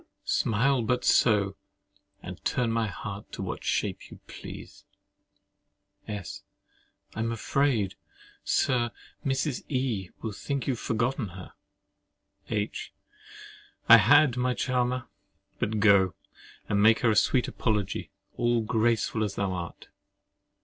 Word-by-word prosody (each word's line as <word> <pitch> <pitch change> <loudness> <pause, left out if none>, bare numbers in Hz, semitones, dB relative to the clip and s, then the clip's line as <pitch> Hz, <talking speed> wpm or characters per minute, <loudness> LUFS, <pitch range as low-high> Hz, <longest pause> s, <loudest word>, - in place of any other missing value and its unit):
Smile 125 +4 +2
but 125 +2 0
so, 100 -4 +3 0.7
and - - -8
turn 120 -2 0
my 115 -1 +1
heart 100 +1 -7
to - - -5
what - - -5
shape - - -2
you - - -12
please! - - -10 1.2
S. 100 -7 -6 0.7
I - - -7
am 115 +1 0
afraid, 115 -3 0 0.5
Sir, 120 -2 +1 0.3
Mrs. 135 0 -1
E—— 125 - -1
will 110 - -2
think 135 +5 -3
you - - +1
have 120 - -7
forgotten 120 +1 -1
her. 90 0 -11 1.0
H. 105 -1 -3 1.0
I - - +11
had, 130 -5 +5
my 125 0 +1
charmer. 125 -1 -1 0.5
But 110 0 -1
go, 100 -5 +5 0.5
and 100 -1 +1
make 110 +1 +5
her 115 - +4
a - - +1
sweet 125 +5 +3
apology, 105 -4 -2 0.3
all 120 -1 +2
graceful 110 0 +1
as 100 -2 -3
thou 100 -2 -1
art. 85 -2 -7
115 Hz, 125 wpm, -28 LUFS, 105-125 Hz, 1.2 s, I